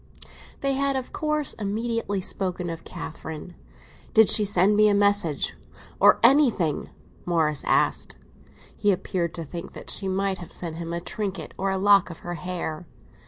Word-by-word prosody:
XVI - - -21 0.3
THEY 275 0 +1
had 275 0 +1
of 260 -1 -4
course 305 -2 0
immediately 215 -1 -2
spoken 180 -2 -2
of 165 - -7
Catherine. 160 0 -8 0.6
"Did 220 -1 +7
she 215 - +6
send 200 +1 +3
me 215 0 +5
a 205 - +3
message, 200 -7 +2 0.4
or—or - - +6
anything?" 235 - +3 0.3
Morris 160 -4 0
asked. - - +1 0.6
He 205 - +2
appeared 180 -3 -2
to 165 - -4
think 170 +3 -8
that - - -7
she 195 - -1
might 190 0 -1
have 175 - -10
sent 165 -2 -4
him 170 0 -5
a 170 0 -3
trinket 195 -1 -4
or 195 +1 -1
a 190 - 0
lock 200 -1 +4
of 165 - -10
her 175 - -3
hair. 175 -1 -5
190 Hz, 165 wpm, -25 LUFS, 170-210 Hz, 0.6 s, Did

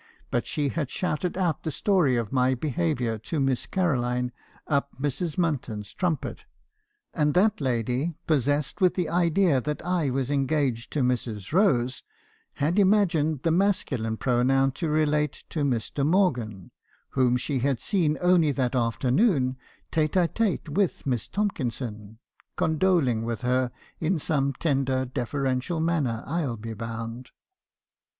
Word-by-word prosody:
But 120 - 0
she 145 -2 -1
had 150 -2 -2
shouted 180 +2 -2
out 175 -5 0
the 160 - -3
story 160 - +2
of 115 -3 -2
my 130 0 +3
behaviour 115 - -1
to 130 +8 -3
Miss 135 -2 0
Caroline 125 -9 0 0.3
up 140 -2 -1
Mrs. 145 +3 -2
Munton's 125 - -2
trumpet; 175 -5 -2 0.7
and 150 -1 +1
that 210 +1 +3
lady, 130 +5 0
possessed 145 - 0
with 180 -1 +4
the 175 -4 -1
idea 170 -3 +3
that 150 +4 -4
I 175 -5 +1
was 130 +1 -1
engaged 135 -4 0
to 150 - +1
Mrs. 120 -4 -2
Rose, 135 - +2 0.5
had 160 +8 +1
imagined 170 -8 +3
the 165 - +2
masculine 160 - 0
pronoun 135 +2 +2
to 160 +4 -3
relate 150 -1 +1
to 155 - -1
Mr. 135 +1 -1
Morgan, 125 - +1 0.4
whom 125 -2 +2
she 130 +2 -2
had 135 -1 0
seen 160 -6 +1
only 175 -4 +4
that 130 -3 0
afternoon 130 - +2 0.4
tete 155 0 +1
a 180 -2 +4
tete 210 -3 -1
with 190 +4 0
Miss 125 -5 -1
Tomkinson, 120 - -3 0.4
condoling 155 -8 +2
with 115 +1 -3
her 125 0 +1 0.3
in 165 +3 +1
some 140 -2 0
tender 135 -2 0
deferential 130 +4 -2
manner, 155 -9 0
I 165 +4 -1
'11 130 -7 -2
be 115 +1 -6
bound. 115 +2 -6
140 Hz, 140 wpm, -26 LUFS, 125-165 Hz, 0.7 s, with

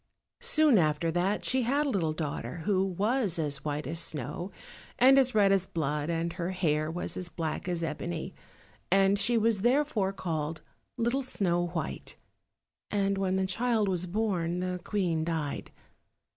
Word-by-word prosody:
Soon 310 - +4
after 155 +1 +1
that 180 +5 0
she 260 0 +2
had 275 +5 +1
a - - 0
little 175 -10 0
daughter, 155 -1 -4
who 190 -2 +2
was 200 +1 0
as 145 -4 -2
white 150 0 -2
as 165 +4 -3
snow, 155 +2 -2 0.5
and 270 +2 +7
as 260 -2 +2
red 200 -2 +5
as 190 -1 +2
blood, 150 -1 -2
and 165 0 -1
her 175 -1 -3
hair 155 -5 0
was 175 +2 -3
as 180 -1 -4
black 165 0 -4
as 175 -2 -1
ebony; 165 +3 -4 0.6
and 195 +1 +4
she 235 +4 +3
was 220 -2 +2
therefore 245 -5 +2
called 160 -4 -3 0.3
Little 240 +4 +1
Snow 175 -8 0
white. 170 -2 -5 0.7
And 200 -1 +1
when 190 -1 +1
the 190 0 +1
child 225 +2 +1
was 180 -1 -1
born, 180 -4 -1
the 180 0 -2
Queen 175 -6 0
died. 160 -3 -3
180 Hz, 160 wpm, -29 LUFS, 165-210 Hz, 0.7 s, and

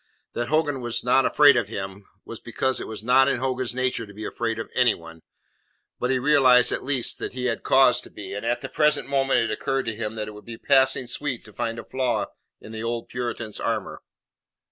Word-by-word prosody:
That 120 0 -2
Hogan 150 -3 0
was 120 -1 -2
not 130 +2 +3
afraid 145 -2 +6
of 120 -4 +1
him, 95 -1 -7 0.2
was - - -8
because 130 -1 -2
it - - -6
was 110 -1 -7
not 130 +3 +5
in - - +1
Hogan's 130 -1 -2
nature 130 -3 -1
to 100 - -13
be 110 +1 -7
afraid 115 0 -3
of 115 - -6
anyone. 85 -10 0 0.8
But 125 - -1
he 130 - +2
realized 130 -2 +5
at - - -2
least 130 -3 0
that - - -5
he 125 0 -4
had 115 -2 -1
cause 130 -2 +4
to - - -13
be, 100 -2 -8
and 100 +1 -5
at 120 +1 -1
the 135 - -6
present 150 -2 +2
moment 135 -1 +2
it 115 - -1
occurred 135 -1 -2
to 115 - -1
him 110 0 -4
that 105 -1 -4
it - - -6
would 105 0 -12
be 115 -1 -8
passing 135 -1 +3
sweet 130 +1 -3
to 105 - -14
find 115 +3 -3
a - - -6
flaw 130 -2 -1 0.3
in 110 - -12
the 110 0 -6
old 115 0 -3
Puritan's 120 -3 -4
armour. - - -3
125 Hz, 225 wpm, -24 LUFS, 115-135 Hz, 0.8 s, afraid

